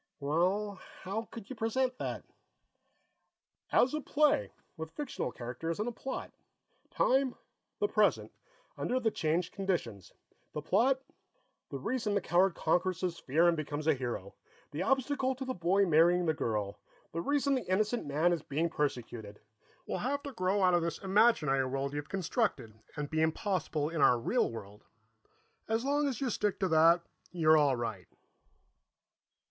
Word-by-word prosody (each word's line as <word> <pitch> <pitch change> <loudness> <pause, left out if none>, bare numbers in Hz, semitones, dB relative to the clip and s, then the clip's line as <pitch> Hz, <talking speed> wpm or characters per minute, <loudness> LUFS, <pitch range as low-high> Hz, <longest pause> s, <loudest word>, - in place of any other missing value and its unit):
"Well, 185 +7 0 0.2
how 205 +4 -3
could 225 -4 -9
you - - -5
present 250 +3 -1
that?" - - -4 1.5
"As 255 - +4
a 305 - -1
play, 285 - +2 0.2
with 160 0 -6
fictional 290 - -4
characters 130 +9 -5
and 215 - -1
a - - -1
plot; 260 +3 -6 0.6
time, 265 -1 +2 0.4
the 415 - +1
present, - - +2 0.5
under 255 - 0
the 225 -3 +1
changed 165 +1 -1
conditions. 165 - -3 0.4
The 150 - -3
plot 250 - +2 0.7
the 140 - -4
reason 220 - -1
the - - +3
coward 180 0 +2
conquers 180 +2 0
his 180 -2 -2
fear 160 +6 +3
and 170 - +4
becomes 150 -1 -4
a 160 - +5
hero, 120 -7 -4 0.4
the 150 - -4
obstacle 265 0 +1
to 265 +1 -5
the 255 - -2
boy 185 +2 +2
marrying 175 +2 +4
the 160 - +2
girl, 105 -7 -2 0.3
the 165 - -3
reason 280 +6 +1
the 255 -8 -2
innocent 215 +5 +1
man 155 +5 +2
is 170 - -2
being 160 +4 -1
persecuted 120 -8 -3 0.5
will - - -3
have 280 +3 -2
to 280 - -5
grow 190 0 +1
out 180 -1 +5
of 175 - +4
this 170 0 -2
imaginary 190 - +3
world 135 +1 -2
you've 145 0 -5
constructed, 185 - -1 0.2
and 145 -1 -4
be 160 0 +1
impossible 160 -2 0
in 165 -2 -2
our 125 - +6
real 115 - +1
world. 105 -2 -9 0.8
As 225 +3 0
long 290 +1 +2
as 260 -5 -2
you 265 -3 -1
stick 210 -1 -1
to 190 - +3
that, 165 +2 +5 0.3
you're 160 -3 +4
all 145 -3 +4
right." 115 -6 -4
175 Hz, 160 wpm, -31 LUFS, 150-225 Hz, 1.5 s, our